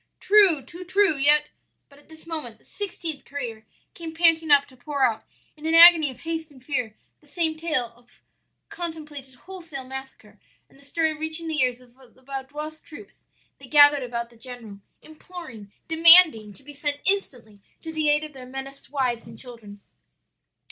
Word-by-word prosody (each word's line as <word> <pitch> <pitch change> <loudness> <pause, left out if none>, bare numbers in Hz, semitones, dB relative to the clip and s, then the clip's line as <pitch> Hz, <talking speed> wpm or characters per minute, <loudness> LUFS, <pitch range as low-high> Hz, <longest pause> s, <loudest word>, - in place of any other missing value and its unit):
"'True, 390 -9 +4
too 350 +1 -10
true! 385 -1 +2
yet 295 +2 +3 0.2
' - - -51
"But 280 0 -19
at 290 - -26
this 315 0 -15
moment 305 -9 -5
the - - -28
sixteenth 340 -7 -4
courier 235 -6 -7 0.3
came 325 -1 -9
panting 325 -1 +2
up 285 -1 +5
to 260 - -19
pour 275 +2 -3
out, 225 -3 +1 0.3
in 310 +1 -7
an 325 - +1
agony 335 -3 +8
of 255 -1 -12
haste 325 -1 -5
and 260 -2 -19
fear, 250 -7 -3 0.2
the 300 - -26
same 320 0 -1
tale 305 -8 -2
of 245 0 -27 0.5
contemplated 300 -6 -8
wholesale 330 -3 -9
massacre, 265 +1 -11 0.3
and - - -24
the - - -18
story 315 +2 -1
reaching 315 +1 -3
the 310 -2 -1
ears 250 -1 0
of 250 -1 -22 0.2
the 260 - -25
Vaudois 285 +4 -7
troops 330 +5 -14 0.4
they 275 - -13
gathered 290 0 +6
about 235 -1 -5
the 235 - -20
general, 230 -4 -10 0.2
imploring, 310 - -12 0.2
demanding 325 - +7
to 275 - -15
be 290 +2 -12
sent 285 0 -3
instantly 245 - -2 0.2
to 320 - -7
the 310 -1 0
aid 295 +1 +2
of 305 -1 -9
their 255 -2 -11
menaced 270 +1 -9
wives 255 -5 -2
and - - -12
children. 225 -5 -11
290 Hz, 180 wpm, -24 LUFS, 255-320 Hz, 0.5 s, agony